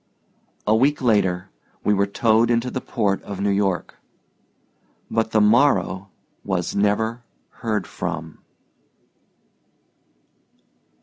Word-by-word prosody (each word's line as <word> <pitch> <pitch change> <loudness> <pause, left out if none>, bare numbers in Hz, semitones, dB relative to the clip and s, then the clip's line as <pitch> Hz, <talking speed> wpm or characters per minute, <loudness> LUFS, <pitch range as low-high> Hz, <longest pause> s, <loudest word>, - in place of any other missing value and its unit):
A 110 - +3
week 140 +6 +2
later 100 -6 +1 0.3
we 105 - +3
were 100 0 +2
towed 110 +3 +2
into 120 +1 +1
the 130 - -3
port 100 -4 -1
of 100 -2 -7
New 100 0 +1
York. 100 -2 -1 1.1
But 110 -1 +1
the 110 - +2
Morrow 105 -5 +3 0.3
was 95 -3 -2
never 110 +3 +1 0.4
heard 110 -3 -2
from. 80 0 -5
105 Hz, 105 wpm, -22 LUFS, 100-115 Hz, 1.1 s, A